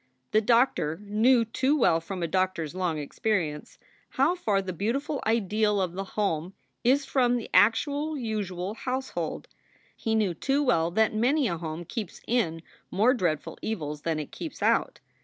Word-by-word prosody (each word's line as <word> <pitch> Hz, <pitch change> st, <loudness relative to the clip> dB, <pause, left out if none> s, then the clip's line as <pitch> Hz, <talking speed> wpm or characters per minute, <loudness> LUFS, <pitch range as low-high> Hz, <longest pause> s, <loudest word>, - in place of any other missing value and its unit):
The 215 Hz, -, +4 dB
doctor 230 Hz, -, +2 dB
knew 225 Hz, +4 st, +3 dB
too 260 Hz, +6 st, +1 dB
well 165 Hz, -, +3 dB
from 180 Hz, +1 st, -5 dB
a -, -, 0 dB
doctor 185 Hz, 0 st, 0 dB
s 155 Hz, -, -7 dB
long 180 Hz, -3 st, -1 dB
experience 155 Hz, 0 st, -2 dB, 0.4 s
how -, -, +4 dB
far 215 Hz, -, 0 dB
the 190 Hz, -1 st, -4 dB
beautiful 270 Hz, -, -2 dB
ideal 215 Hz, -1 st, +2 dB
of 180 Hz, -3 st, -1 dB
the 195 Hz, +2 st, -3 dB
home 180 Hz, -3 st, -1 dB, 0.3 s
is 270 Hz, +4 st, +3 dB
from 245 Hz, -2 st, +2 dB
the 235 Hz, -, -7 dB
actual 285 Hz, +10 st, +3 dB
usual 205 Hz, -6 st, -3 dB
house 260 Hz, +3 st, -3 dB
hold. -, -, -4 dB, 0.5 s
He 220 Hz, 0 st, -1 dB
knew 210 Hz, -5 st, +1 dB
too 275 Hz, -, 0 dB
well 170 Hz, -, +2 dB
that 220 Hz, +5 st, +2 dB
many 255 Hz, +6 st, +2 dB
a 170 Hz, -4 st, -2 dB
home 160 Hz, +1 st, -5 dB
keeps 210 Hz, 0 st, -6 dB
in 170 Hz, -9 st, 0 dB, 0.3 s
more 220 Hz, +7 st, +3 dB
dreadful 170 Hz, -, -2 dB
evils 150 Hz, -9 st, -4 dB
than 165 Hz, -1 st, -1 dB
it 150 Hz, -2 st, -5 dB
keeps -, -, -7 dB
out. -, -, +1 dB
210 Hz, 170 wpm, -27 LUFS, 170-245 Hz, 0.5 s, The